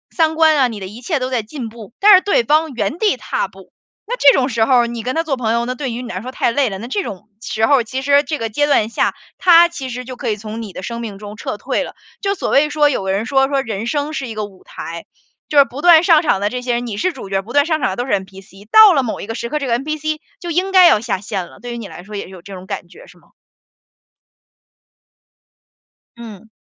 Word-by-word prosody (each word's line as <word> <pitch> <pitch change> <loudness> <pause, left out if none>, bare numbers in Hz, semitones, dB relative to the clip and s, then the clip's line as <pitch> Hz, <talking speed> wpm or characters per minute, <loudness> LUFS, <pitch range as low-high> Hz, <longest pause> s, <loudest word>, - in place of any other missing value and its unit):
三 320 -2 +2
观 315 -2 +4
啊， 260 -2 +4
你 220 -3 -7
的 190 - -6
一 220 +5 -11
切 310 +1 -1
都 255 0 -2
在 250 -3 0
进 240 0 -7
步， 225 -1 -12
但 415 +1 +7
是 375 - +7
对 400 -12 +2
方 305 +4 +2
原 235 +4 -2
地 420 +2 +2
踏 - - -3
步， - - -17 0.3
那 485 +4 -3
这 280 - +6
种 265 0 +1
时 225 -1 +1
候 260 - +2
儿 235 - 0
你 235 -1 -5
跟 255 +5 -3
他 325 - +1
做 275 -5 -2
朋 225 -2 0
友， 235 0 0
那 255 - -3
对 265 -1 -4
于 245 - -5
你 240 - -8
来 185 - -5
说 255 +2 -7
太 240 - 0
累 270 0 +1
了。 195 - -5
那 230 +5 -7
这 395 +10 -1
种 205 - -8
时 220 -1 0
候， 270 -1 +3
其 260 +4 -4
实 285 +1 +4
这 295 +2 -3
个 225 -1 -3
阶 290 +7 +1
段 225 -7 +2
下， - - 0 0.2
他 345 -1 +6
其 275 -6 -6
实 250 +1 -5
就 255 -1 -9
可 - - -3
以 210 - 0
从 215 +2 -7
你 210 -4 -8
的 185 - -8
生 235 +3 -5
命 215 -4 -6
中 210 +1 -10
撤 - - -4
退 - - -2
了。 - - -9 0.3
就 395 0 0
所 - - -3
谓 300 +2 +3
说 295 0 +3
有 225 -8 -2
的 190 - 0
人 205 +3 -1
说， 270 +1 +2
说：‘’ 275 -1 0
人 220 -1 -4
生 290 +2 -1
是 275 -4 -4
一 225 - -7
个 215 - -3
舞 195 -2 -16
台。‘’ 165 0 -8 0.5
就 295 - 0
是 280 - +8
不 275 +2 -8
断 340 -2 +7
上 330 -3 +5
场 245 - +1
的 205 - 0
这 250 +1 -4
些 245 -1 -1
人 240 0 -3
你 210 - -4
是 370 - 0
主 250 - -10
角， 195 0 0
不 220 +5 -12
断 285 0 +3
上 315 -3 -1
场 - - +1
的 190 - -5
都 245 - -2
是 260 - -2
NPC。 195 +1 -6
到 435 -4 +9
了 275 - +2
某 225 - -4
一 - - -7
个 225 - -4
时 235 - -4
刻， 300 - -1
这 275 - -3
个 235 -1 +2
NPC 310 +1 -3 0.2
就 345 - -7
应 370 +4 0
该 370 -2 +8
要 210 - +4
下 220 -5 -2
线 195 -3 -4
了， - - -17
对 245 0 -7
于 - - -5
你 225 -4 -7
来 175 - -10
说 210 +1 -9
也 200 - -4
是 - - -12
有 185 -2 -12
这 195 +3 -11
种 185 0 -9
感 190 -3 -6
觉 - - -15
是 - - -18
吗？ - - -26 2.9
嗯。 225 -3 -11
245 Hz, 320 characters per minute, -18 LUFS, 215-295 Hz, 2.9 s, 到